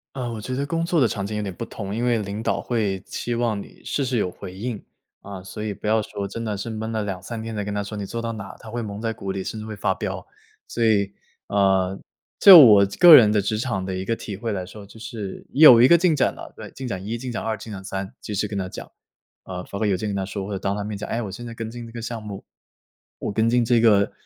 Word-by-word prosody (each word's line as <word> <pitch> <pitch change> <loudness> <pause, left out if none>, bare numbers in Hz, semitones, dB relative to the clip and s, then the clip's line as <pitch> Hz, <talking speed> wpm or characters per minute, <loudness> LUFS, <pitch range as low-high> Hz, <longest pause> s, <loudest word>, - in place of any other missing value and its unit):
呃， 125 -3 -3
我 115 - -5
觉 125 +4 -4
得 140 - -1
工 165 +2 -1
作 170 -2 +1
的 125 - +5
场 100 -3 -3
景 105 +2 -4
有 - - -1
点 100 -3 -4
不 115 - -5
同， 100 -3 -6
因 120 +2 -1
为 120 -2 +2
领 100 +2 -5
导 - - 0
会 105 -5 -1
期 120 - -5
望 115 -3 0
你 - - -12
事 140 - -1
事 125 -1 -1
有 95 - 0
回 90 0 -9
应。 110 +2 -5 0.4
啊， 100 -2 -8
所 95 +3 -7
以 105 -1 -2
不 105 - -7
要 110 +1 +3
说 100 -1 -5
真 115 +3 -6
的 105 -3 -3
是 100 +4 -5
闷 110 0 -4
了 110 -1 -1
2-3 100 +3 -5
天 115 0 -6
才 105 - -2
跟 105 0 -4
他 105 - -1
说 100 +1 -6
你 100 - -4
做 115 +4 -5
到 115 0 -3
哪， 100 -3 -8
他 110 - -11
会 120 +2 -4
蒙 105 -1 -6
在 115 -1 -1
鼓 95 -3 -5
里， 95 - -3
甚 110 - -5
至 105 - -7
会 110 - -6
发 - - 0
飙。 - - -5 0.4
所 120 - -2
以， 100 -3 +2 0.3
呃， 95 -1 +2 0.4
就 190 -4 +12
我 105 -8 +8
这 100 - -8
个 175 -3 +11
人 110 -6 +7
的 105 -1 +2
职 105 +2 -1
场 110 -5 -2
的 95 -1 -3
一 95 - -3
个 115 +4 -1
体 100 - -6
会 110 +3 -4
来 95 -3 -3
说， 100 +2 -11
就 100 +3 -15
是， 110 -4 -7
你 145 - 0
有 125 -7 +10
一 125 - +8
个 170 - +7
进 170 -1 +3
展 145 - +1
了 - - -10
对， - - -8
进 130 - -8
展 95 -6 -4
1、 115 +2 -2
进 125 +1 -6
展 115 - -3
2、 110 -1 -2
进 110 - -10
展 95 -2 -7
3， 95 +2 -5
及 105 - -7
时 105 +2 0
跟 100 - -3
他 95 - -3
讲。 - - -9 0.5
呃， 90 -1 -6
发 100 - -7
个 110 - +1
邮 100 - +2
件 110 - -4
跟 100 - -3
他 95 -1 -2
说， 100 0 -5
或 105 - -7
者 95 - -3
当 100 +1 -1
他 105 - -3
面 105 0 -5
讲： 100 - -6
“诶， 115 - -1
我 105 -4 -5
现 120 +5 -8
在 115 - -7
跟 115 -1 -6
进 120 0 -8
这 - - -12
个 120 - -6
项 115 0 -5
目， 105 -2 -8 0.8
我 - - -3
跟 110 +3 +2
进 120 0 +3
这 120 0 +3
个， 105 -3 +4
110 Hz, 310 characters per minute, -23 LUFS, 100-115 Hz, 0.8 s, 就